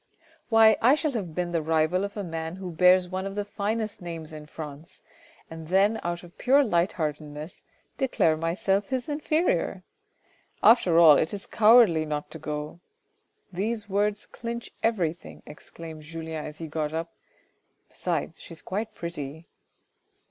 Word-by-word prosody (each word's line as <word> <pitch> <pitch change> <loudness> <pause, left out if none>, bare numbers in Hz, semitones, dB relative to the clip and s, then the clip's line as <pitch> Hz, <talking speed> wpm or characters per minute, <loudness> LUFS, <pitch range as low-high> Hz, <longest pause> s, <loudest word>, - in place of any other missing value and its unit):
" - - -32
Why! 225 -1 +6
I 255 +5 +6
shall 305 -1 -1
have 190 - -4
been 175 -1 -2
the 165 -2 0
rival 160 +4 +1
of 200 +1 -5
a 205 - -2
man 165 -1 -5
who 185 -1 -6
bears 180 +2 +5
one 190 +1 -3
of 195 - -7
the 205 0 -2
finest 215 +1 -3
names 165 -3 -6
in 150 -1 -9
France, 150 0 -9 0.4
and 160 -1 -9
then 200 +5 +3
out 175 +1 -3
of 175 0 -16
pure 275 +3 +5
light 180 -6 +1
heartedness, 150 0 -5 0.4
declared 165 - +2
myself 190 +4 0
his 255 -2 -2
inferior! 310 +3 0 0.8
After 190 -8 +6
all, 160 -4 +8
it 160 - 0
is 200 - -9
cowardly 215 -7 +5
not 150 -1 -4
to - - -8
go; 150 +2 -5 0.7
these 215 +4 -2
words 205 +1 0
clinch 235 0 -6
everything," 175 -8 -2
exclaimed 160 0 -10
Julien 160 0 -6
as 150 0 -7
he 165 - -6
got 155 0 -3
up... 165 +1 -4 0.4
" - - -47
besides - - -3
she - - -10
is 160 - -10
quite 215 +3 -4
pretty." 160 -2 -6
175 Hz, 160 wpm, -26 LUFS, 160-210 Hz, 0.8 s, all